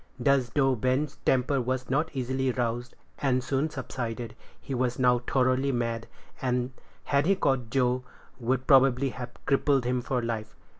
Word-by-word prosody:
Thus, 140 -3 +3
though 135 -2 +4
Ben's 130 +5 0
temper 130 +1 +2
was 130 +1 -2
not 150 +5 +1
easily 130 +1 0
roused, 120 0 -2 0.2
and 130 -3 +1
soon 135 +5 0
subsided, 120 -5 -5 0.2
he 135 - -6
was 125 -1 0
now 125 -1 +4
thoroughly 130 +2 +1
mad, 115 -2 -2 0.3
and, 125 -1 0 0.3
had 140 +2 +1
he 195 - +4
caught 135 -9 0
Joe, 125 +1 +1 0.4
would 130 +2 0
probably 135 -1 +5
have 125 -1 -6 0.2
crippled 140 -2 +2
him 125 0 0
for 125 +1 -1
life. 110 -2 -4
130 Hz, 155 wpm, -28 LUFS, 120-135 Hz, 0.4 s, probably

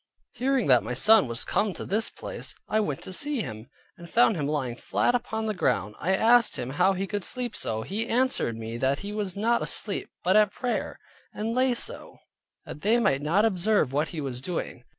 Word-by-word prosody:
Hearing 265 -1 0
that 125 -3 +5
my 125 - -4
son 215 - +6
was 115 +1 -1
come 200 -1 0
to - - -6
this 215 +4 +1
place, - - -5
I 215 - +1
went 150 -10 -2
to 185 - -7
see 290 +3 0
him, 110 - -7 0.3
and 170 -1 -12
found 230 0 +4
him 145 -4 -2
lying 135 -5 -2
flat 240 - 0
upon 225 -2 -2
the 215 - -1
ground. 105 - 0
I 190 +4 +1
asked 230 +3 +4
him 125 +2 -4
how 180 +6 +3
he 190 +1 -2
could 205 0 -3
sleep 250 +3 -4
so? 110 0 -3
He 215 - -3
answered 245 - +1
me 115 +1 -5
that 135 +3 0
he 200 +1 -6
was 205 -3 -3
not 235 +3 +2
asleep, 205 - -1
but 185 +3 +3
at 210 -2 +4
prayer; 250 -1 -3 0.4
and 220 +2 -2
lay 255 0 +2
so, 475 - -5 0.5
that 150 - -9
they 220 +4 +3
might 190 -12 +2
not 175 +9 +2
observe 195 - +1
what 150 +2 +1
he 160 - -5
was 130 -3 -5
doing. 135 -6 -5
195 Hz, 210 wpm, -26 LUFS, 140-225 Hz, 0.5 s, son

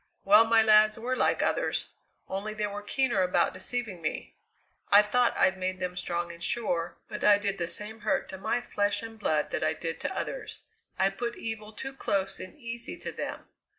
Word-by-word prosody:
Well, 210 +3 +7
my 225 0 +5
lads 215 0 +6
were 245 +3 -2
like - - +2
others, - - 0 0.4
only 205 +3 -4
they 210 0 -1
were 205 0 -5
keener 240 -1 +1
about 180 0 +2
deceiving 200 -1 -4
me. 155 - -4 0.6
I 205 +1 +8
thought 240 +3 +2
I'd 190 0 +3
made 185 0 -2
them 180 -1 -3
strong 175 -1 -2
and 170 0 -10
sure, 175 -8 -1
but - - -6
I 205 -1 +7
did 200 -1 -2
the 170 - -1
same 215 +4 +1
hurt 215 0 0
to 190 - -7
my 240 +5 0
flesh 205 -3 -1
and 225 -1 -9
blood 155 -7 0
that - - -1
I - - +2
did - - -5
to - - -4
others. - - -5 0.3
I 195 +1 +3
put 235 +4 -4
evil 220 -1 -5
too 265 +5 -7
close 195 -7 -1
and 185 +7 -9
easy 235 -3 -6
to - - -6
them. - - -5
210 Hz, 200 wpm, -28 LUFS, 185-225 Hz, 0.6 s, I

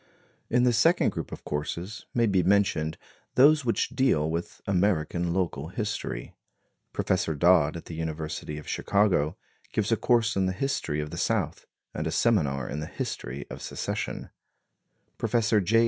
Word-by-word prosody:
In 125 +1 +3
the 125 -1 +4
second 165 +10 +4
group - - -5
of - - -8
courses 85 +8 -4
may 120 -1 +2
be 95 -4 +3
mentioned 90 -4 +2 0.4
those 145 +3 +6
which 115 -2 +1
deal 80 - +2
with 85 +1 -4
American 90 -3 +1
local 85 -5 -1
history. 100 - -4 0.6
Professor 80 - 0
Dodd 85 0 +4
at 85 - -10
the - - -8
University 80 -1 -4
of 75 - -9
Chicago 95 -7 +1 0.4
gives 105 +1 0
a - - +5
course 115 0 +2
in 95 -1 +2
the 95 - 0
history 95 - -1
of 75 0 -6
the - - -6
South, - - -1 0.3
and - - -2
a - - -1
seminar 70 - +2
in 75 - -4
the 75 - -4
history 65 +4 -5
of - - -7
Secession; - - -4 0.9
Professor 110 -3 +2
J. 110 +5 +3
90 Hz, 160 wpm, -27 LUFS, 80-110 Hz, 0.9 s, those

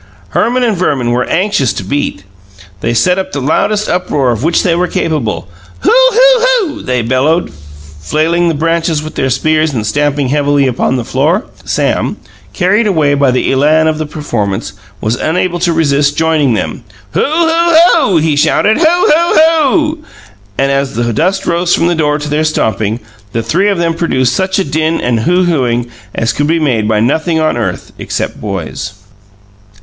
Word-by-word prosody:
Herman 245 - 0
and 225 -4 +1
Verman 140 -9 0
were 125 +1 0
anxious 185 - 0
to - - -5
beat. 100 -3 -3 0.6
They 115 - -1
set 180 +9 +2
up 190 0 -5
the 145 - -2
loudest 205 +9 0
uproar 145 -7 0
of 115 -2 -3
which 165 +1 +2
they 175 - +2
were 180 +2 0
capable. 140 - -2 0.3
"Hoo! 410 - +2
Hoo! - - +4 0.3
Hoo!" 310 - -9
they 125 -2 -1
bellowed, 135 +8 0 0.5
flailing 165 - 0
the 165 - 0
branches 165 0 0
with 155 +1 -7
their 130 - -1
spears 155 +3 +1
and 110 -4 -2
stamping 145 +3 0
heavily 145 0 +1
upon 130 0 0
the 120 -3 -3
floor. 155 - 0 0.2
Sam, - - -1 0.3
carried 205 +4 +1
away 155 -7 +2
by 140 -1 +2
the 125 0 0
elan 150 +4 +3
of 155 -1 -1
the 155 - -3
performance, 115 -10 -3 0.3
was 110 +2 -1
unable 175 +4 -1
to 175 0 +1
resist 145 -3 +1
joining 155 -6 +2
them. 115 - -4 0.3
"Hoo! - - -1
Hoo! 330 +2 +2 0.2
Hoo!" 235 - +2
he 155 -1 +1
shouted. 210 - +2
"Hoo! - - +2
Hoo! 340 0 +3
Hoo!" 315 0 +2 0.6
And 135 0 +1
as 140 -2 -1
the 120 0 -1
dust 185 - 0
rose 175 +1 +1
from 165 - 0
the 175 0 +1
floor 150 -2 +1
to 150 0 -6
their 150 +1 0
stamping, 110 -7 -1 0.3
the 115 - -1
three 190 - +1
of 200 - 0
them 170 -1 0
produced 130 -7 0
such 190 0 0
a 195 - +1
din 160 -1 -1
and 120 -2 0
hoo 180 +11 +2
hooing 120 -8 0 0.2
as 115 0 0
could 145 +5 -1
be 165 +2 +1
made 120 -9 0
by 110 -1 +1
nothing 160 +7 0
on 155 0 +1
earth - - -4
except - - -4
boys. - - -5
155 Hz, 180 wpm, -12 LUFS, 130-180 Hz, 0.6 s, Hoo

